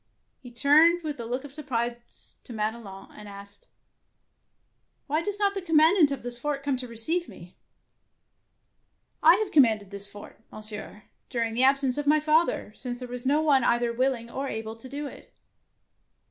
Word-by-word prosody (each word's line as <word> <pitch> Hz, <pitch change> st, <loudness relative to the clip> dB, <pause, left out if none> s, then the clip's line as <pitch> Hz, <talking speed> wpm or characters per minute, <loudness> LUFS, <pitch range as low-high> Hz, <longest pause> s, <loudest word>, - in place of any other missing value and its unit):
He 250 Hz, -, -12 dB
turned 305 Hz, +8 st, +4 dB
with 300 Hz, -4 st, -5 dB
a 230 Hz, -, -6 dB
look 250 Hz, +3 st, -3 dB
of 285 Hz, -2 st, -5 dB
surprise 240 Hz, -5 st, -5 dB
to 245 Hz, -, -10 dB
Madelon, 215 Hz, -3 st, -5 dB
and 210 Hz, -, -12 dB
asked, 200 Hz, 0 st, -13 dB, 0.5 s
— -, -, -49 dB
" -, -, -48 dB
Why 305 Hz, +3 st, -1 dB
does 410 Hz, +3 st, -4 dB
not 405 Hz, -1 st, +1 dB
the 390 Hz, -, -4 dB
commandant 325 Hz, -1 st, +4 dB
of 275 Hz, -3 st, -4 dB
this 240 Hz, 0 st, +2 dB
fort 285 Hz, 0 st, -3 dB
come 280 Hz, -1 st, 0 dB
to 250 Hz, 0 st, -6 dB
receive 315 Hz, +10 st, 0 dB
meT' 175 Hz, +1 st, -13 dB, 0.9 s
" -, -, -48 dB
I -, -, +6 dB
have 415 Hz, 0 st, -2 dB
commanded 220 Hz, -, +3 dB
this 200 Hz, 0 st, -1 dB
fort. 205 Hz, -, -13 dB
Mon 215 Hz, -, -10 dB
sieur, 210 Hz, -1 st, -5 dB, 0.3 s
during 230 Hz, -3 st, -2 dB
the 245 Hz, +3 st, +1 dB
absence 270 Hz, 0 st, +2 dB
of 290 Hz, -, -4 dB
my 305 Hz, +1 st, +4 dB
father, 310 Hz, -6 st, +1 dB
since 245 Hz, +2 st, -6 dB
there 250 Hz, 0 st, -6 dB
was 245 Hz, +1 st, -2 dB
none 300 Hz, +3 st, +2 dB, 0.2 s
other -, -, 0 dB
either 240 Hz, 0 st, +1 dB
will 260 Hz, +2 st, +1 dB
ing 235 Hz, -1 st, -11 dB
or 275 Hz, +1 st, -4 dB
able 220 Hz, -2 st, -5 dB
to 230 Hz, +3 st, -8 dB
do 285 Hz, +2 st, -5 dB
it. 280 Hz, -, -11 dB
255 Hz, 190 wpm, -26 LUFS, 230-300 Hz, 0.9 s, I